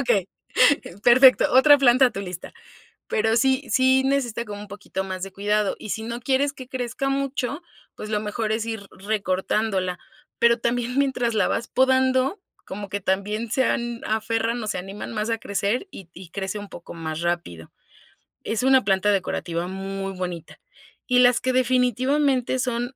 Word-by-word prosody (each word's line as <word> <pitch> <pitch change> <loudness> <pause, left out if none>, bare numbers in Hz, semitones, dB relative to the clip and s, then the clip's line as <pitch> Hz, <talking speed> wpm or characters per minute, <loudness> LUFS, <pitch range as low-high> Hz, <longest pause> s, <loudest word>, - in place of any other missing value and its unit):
okey, 200 -8 +1 0.7
perfecto, 255 +2 +6
otra 285 +3 +7
planta 255 0 +5
a - - 0
tu 195 - -6
lista. 180 -3 -7 0.6
Pero 220 +1 +1
sí 265 +3 +2
sí 260 0 +4
necesita 255 -4 0
como 205 -2 -8
un 210 - -10
poquito 195 -1 -5
más 185 -1 -5
de 195 - -5
cuidado 205 +1 0
y, 210 - -8
si 220 - -3
no 235 +1 -5
quieres 270 +3 +1
que 260 -2 -11
crezca 255 +1 -3
mucho, 275 +2 -2 0.3
pues 215 - -8
lo 210 - 0
mejor 215 +1 -2
es 225 +1 -1
ir 220 -3 -5
recortándola, 190 -1 -1 0.4
pero 235 0 +4
también 245 +2 -1
mientras 250 -4 +1
la 205 -3 +2
vas 235 - -2
podando 260 +4 +2 0.3
como 200 0 -7
que 200 - -3
también 205 +4 -2
se 260 +3 +2
han 235 -1 -2
aferran 225 +2 -1
o - - -5
se 215 - -2
animan 195 +5 -7
más 215 +1 -2
a 225 - 0
crecer 205 - -2
y 190 - -11
y 180 -1 -11
crece 195 +1 -4
un 205 -1 -8
poco 175 - -10
más 160 -1 -5
rápido. 170 - -3 0.7
Es 220 +2 -2
una 265 0 +5
planta 195 +1 +2
decorativa 175 -2 -2
muy 195 +1 -5
bonita 180 -3 -6 0.5
y 250 -1 +4
las 245 -1 +5
que 255 0 0
definitivamente 255 +1 +1
son 245 0 -2
225 Hz, 175 wpm, -23 LUFS, 195-255 Hz, 0.7 s, otra